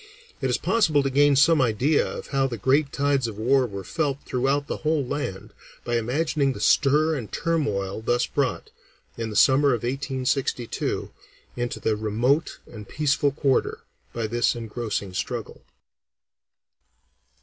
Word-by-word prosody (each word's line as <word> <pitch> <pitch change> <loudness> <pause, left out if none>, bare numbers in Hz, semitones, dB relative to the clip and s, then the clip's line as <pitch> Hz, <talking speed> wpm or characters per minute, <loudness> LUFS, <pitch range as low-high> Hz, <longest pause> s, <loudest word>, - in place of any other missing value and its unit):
It - - 0
is - - +1
possible 160 -11 +2
to 135 - -1
gain 145 +1 +4
some 150 +2 +5
idea 130 +5 +2
of - - -6
how 135 -1 +1
the 120 -3 -5
great 140 +6 +2
tides 140 -3 +1
of 110 -3 -7
war 130 +4 +2
were 100 -3 -7
felt 145 - -1
throughout 135 +3 0
the - - -4
whole 155 -3 0
land 125 -8 -5 0.3
by 120 0 0
imagining 140 +4 0
the - - -9
stir 150 +3 +3
and 125 -8 -5
turmoil 110 - -1
thus 120 +2 +1
brought, - - -2 0.4
in 115 -1 -4
the 105 - -7
summer 135 +1 +5
of 115 - -7
1862, 130 -1 -2 0.4
into 120 0 -3
this 110 -1 -1
remote 120 +9 0
and 105 -3 -11
peaceful 145 -1 +1
quarter 140 -2 0 0.3
by 115 -1 -3
the 120 +2 -3
engrossing 110 -4 -4
struggle. - - -5
135 Hz, 150 wpm, -24 LUFS, 115-145 Hz, 0.4 s, some